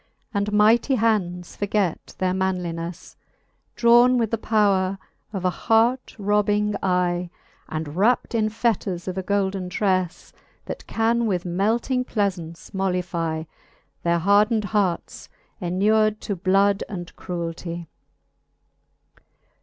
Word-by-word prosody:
And 200 0 0
mighty 220 +6 +4
hands 190 -7 0
forget 200 -4 -1
their 185 -1 0
manlinefle; 180 -2 -3 0.6
Drawne 240 +2 +5
with 230 -3 0
the 230 - +1
powre 195 -4 +2 0.3
of 190 -3 -4
an 180 - +3
heart 230 +6 +1
robbing 210 0 +1
eye, 180 -1 0 0.4
And 155 -1 -4
wrapt 225 +8 +2
in 215 -2 +1
fetters 205 -6 -1
of 185 - -3
a 190 - -2
golden 190 -1 -1
trelTe, 185 -2 -1 0.3
That - - -7
can 230 +1 +1
with 180 -4 -1
melting 225 +8 0
plealaunce 180 -7 -3
moUifye 175 -4 -2 0.6
Their 170 0 +2
hardned 205 +5 +3
hearts, 200 -5 -1 0.3
enur'd 215 +4 +2
to 200 - -3
bloud 195 +2 +2
and 175 -4 -7
cruelty. 170 -1 -5
195 Hz, 115 wpm, -23 LUFS, 180-215 Hz, 0.6 s, Drawne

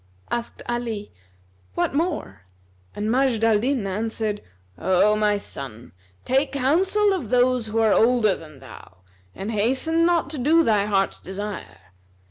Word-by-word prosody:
'" - - -35
Asked 235 0 -3
Ali, 230 -4 -3 0.6
"What - - 0
more?" 320 - -2 0.5
And 210 +1 -2
Majd 250 -3 +2
al 225 -2 +4
Din 250 -1 0
answered, 215 +1 -2 0.3
"O 190 +3 +3
my 210 -1 +2
son, 130 - -9 0.3
take 270 +2 +1
counsel 375 +10 +2
of 305 - -4
those 250 -1 +2
who 215 +1 -3
are 220 -2 +4
older 230 -3 +4
than 155 -4 -13
thou 95 -7 -14 0.3
and 200 +3 -4
hasten 265 +10 +1
not 335 -4 +2
to 300 - -4
do 320 +6 +4
thy 210 -6 +2
heart's 195 -2 0
desire. 185 - -7
225 Hz, 145 wpm, -23 LUFS, 205-270 Hz, 0.6 s, al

